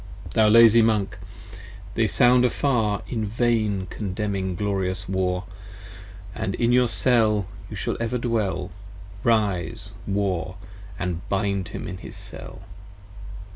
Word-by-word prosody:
Thou 110 -1 +4
lazy 115 +1 +7
Monk, 105 -4 +1 0.7
they 115 -1 +2
sound 125 +2 +4
afar, 120 -5 +1
In 115 -3 -2
vain 110 -3 0
condemning 100 -2 -3
glorious 95 -1 -2
War, 90 -1 -1 0.9
65 - - -6
And 95 - -1
in 120 0 +1
your 125 0 +4
Cell 110 -4 +2 0.2
you 105 - -7
shall 100 - -2
ever 115 +2 -1
dwell: 110 -6 -1 0.5
Rise, 100 -5 0 0.2
War, 95 -2 -1 0.4
& 90 -2 -4
bind 100 -2 0
him - - -6
in 95 - -6
his - - -9
Cell. 95 - -8
105 Hz, 125 wpm, -24 LUFS, 95-115 Hz, 0.9 s, lazy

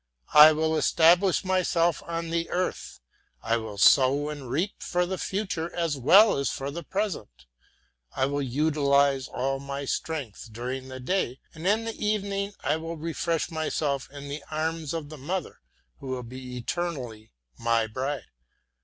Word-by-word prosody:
I 150 +1 +10
will 160 +1 +1
establish 175 +5 +4
myself 175 -3 +1
on 165 -1 -3
the 165 0 -1
earth, 180 +1 -3 0.4
I 115 +1 +1
will 110 -3 -6
sow 140 +8 +5
and 145 -4 -7
reap 170 +11 -2
for 180 0 0
the 185 +1 -4
future 185 -4 -2
as 165 -3 0
well 185 - +6
as 140 - 0
for 135 +1 -4
the 170 +4 -5
present. 170 - -4 0.7
I 130 - +2
will 145 +1 -1
utilize 140 0 +2
all 135 +2 -2
my 140 0 -5
strength 135 -7 -4
during 125 +4 -5
the 130 0 -8
day, 130 -2 -1
and 165 +3 -5
in 220 +3 +2
the 225 -1 -5
evening 200 -1 -1
I - - +1
will 165 +1 -6
refresh 165 +1 -2
myself 150 -3 -1
in 140 0 -9
the 140 +1 -6
arms 160 0 -2
of 155 -3 -5
the 155 -1 -10
mother, 175 +5 -4 0.4
who - - -9
will 130 -1 -3
be 125 +1 -8
eternally 125 -6 -4 0.3
my 115 -1 +2
bride. 130 +6 -3
150 Hz, 160 wpm, -27 LUFS, 130-170 Hz, 0.7 s, I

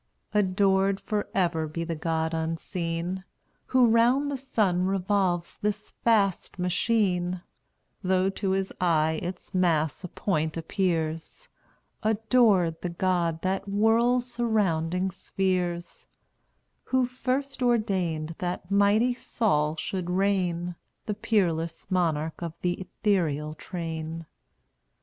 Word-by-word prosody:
Adored 195 -1 +2
forever 175 -6 -1
be 165 +2 -4
the 165 0 -3
God 160 +1 -1
unseen, 165 +2 -3 0.4
Who 255 -1 +5
round 240 +5 +3
the - - -1
sun 205 -9 +1
revolves 190 -2 0
this 210 0 -2
vast 200 -7 +2
machine; 180 -1 +1 0.6
Though 185 +1 +2
to 195 0 -2
his 190 0 0
eye 160 -2 +2
its 180 +2 -6
mass 165 -4 +1
a - - -3
point 160 -4 -1
appears: 165 - -2 0.5
Adored 215 -6 +3
the 180 - -2
God 170 -2 0
that 190 +1 0
whirls 225 +5 +3
surrounding 190 -7 0
spheres, 180 -2 -2 0.8
Who 260 -1 +2
first 260 +2 -2
ordained 185 -10 +1
that 180 +1 -4
mighty 205 +5 +4
Sol 155 -11 0
should 180 +2 -3
reign, 180 -2 0 0.3
The 210 - -1
peerless 175 -6 0
monarch 160 -3 0
of 165 -2 -5
th' 175 -1 +2
ethereal 165 -7 0
train. 165 -1 -5
185 Hz, 110 wpm, -27 LUFS, 165-210 Hz, 0.8 s, Who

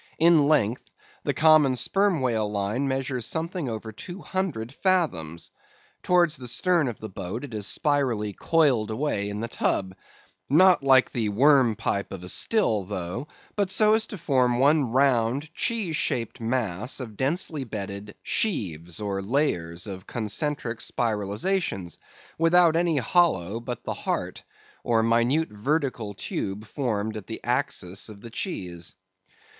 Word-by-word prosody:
In 160 -3 +5
length, 125 -6 +1 0.4
the - - +1
common 155 -4 +5
sperm 195 +3 +2
whale 110 -5 0
line 105 +7 -1
measures 130 -2 -2
something 165 - -3
over 110 -1 -5
two 175 - -9
hundred 160 -12 -3
fathoms. 135 - -1 0.5
Towards 175 -4 +3
the 125 -1 -6
stern 170 +4 +2
of 120 - -5
the 110 - -6
boat 95 +4 -6
it 135 -5 -8
is 105 -2 -1
spirally 125 -9 0
coiled 135 - +2
away 110 -4 -1
in 105 +1 -4
the 115 - -2
tub, 95 -4 -1 0.5
not 180 +5 +6
like 135 -2 +5
the 110 -3 -1
worm 130 +1 +4
pipe 100 0 -2
of 95 -2 -7
a 90 - -7
still 195 - +2
though, 95 +7 -5 0.3
but 200 -2 0
so 215 +2 +5
as 220 0 +2
to 210 - -7
form 130 -7 +2
one 140 -1 +3
round, 135 +3 +1
cheese 200 -9 -1
shaped 115 -1 -2
mass 115 -2 -1
of 115 -5 -7
densely 150 - -1
bedded 105 -3 -6
"sheaves," 90 - -1
or 100 -2 -2
layers 95 - -1
of 95 -3 -8
concentric 120 +2 -2
spiralizations, 105 - -2 0.4
without 165 0 +5
any 170 -2 +2
hollow 115 - +2
but 120 0 -6
the - - -3
"heart," - - -3 0.4
or 115 -1 +2
minute 120 +7 +2
vertical 115 -2 -2
tube 100 +1 -4
formed 110 -4 -2
at 105 -3 -7
the 110 - -6
axis 120 -7 -1
of 100 -2 -12
the 115 - -10
cheese. 90 - -5
120 Hz, 145 wpm, -25 LUFS, 105-155 Hz, 0.5 s, not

